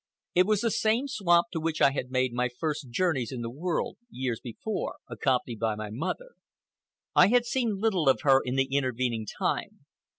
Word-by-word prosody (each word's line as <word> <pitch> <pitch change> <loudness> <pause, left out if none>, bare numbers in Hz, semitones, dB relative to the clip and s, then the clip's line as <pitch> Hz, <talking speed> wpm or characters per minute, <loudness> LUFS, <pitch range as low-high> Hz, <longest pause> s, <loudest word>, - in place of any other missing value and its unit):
It 180 +1 +4
was 215 -2 +2
the 230 - +1
same 225 +7 +1
swamp 195 -6 +2
to 165 - -2
which 160 0 -2
I 135 - +6
had 135 -2 -4
made 130 -1 0
my 125 +1 0
first 145 +1 -4
journeys 135 -3 0
in 125 -2 -5
the 115 0 -4
world, 165 +6 -2
years 125 - -3
before, 190 - -4
accompanied 125 -4 -1
by 110 -2 0
my 105 -1 -6
mother. 185 - -4 0.8
I - - +7
had 245 +3 +3
seen 235 -4 0
little 190 -9 +2
of 135 - +3
her 135 -3 +5
in 125 +1 -2
the 135 0 +3
intervening 125 -4 0
time. - - -3
140 Hz, 190 wpm, -28 LUFS, 125-195 Hz, 0.8 s, I